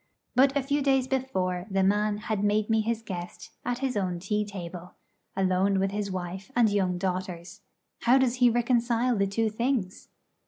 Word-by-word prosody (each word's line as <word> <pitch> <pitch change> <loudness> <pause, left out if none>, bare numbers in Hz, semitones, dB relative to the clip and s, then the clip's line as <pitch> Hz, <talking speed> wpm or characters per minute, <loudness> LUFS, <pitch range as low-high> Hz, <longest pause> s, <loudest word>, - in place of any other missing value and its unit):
But 270 +3 +4
a 280 - 0
few 285 +2 0
days 270 -2 +2
before 190 -9 -1
the 195 -1 +1
man 205 +2 +2
had 210 -1 -2
made 210 +1 +1
me 220 0 +3
his 225 +1 -2
guest 175 -4 -7
at 245 0 -1
his 260 - -2
own 185 -3 -1
tea 210 +4 -1
table, 180 -3 -8 0.4
alone 190 +1 +2
with 195 0 0
his 205 0 -2
wife 185 +2 -5
and 235 -2 +5
young 185 -3 +1
daughters. 185 0 -4 0.4
How 245 +3 +4
does 255 -2 +2
he 245 -1 +5
reconcile 240 0 +1
the 200 -1 +1
two 220 +2 0
things? 230 -4 -2
210 Hz, 180 wpm, -27 LUFS, 185-240 Hz, 0.4 s, and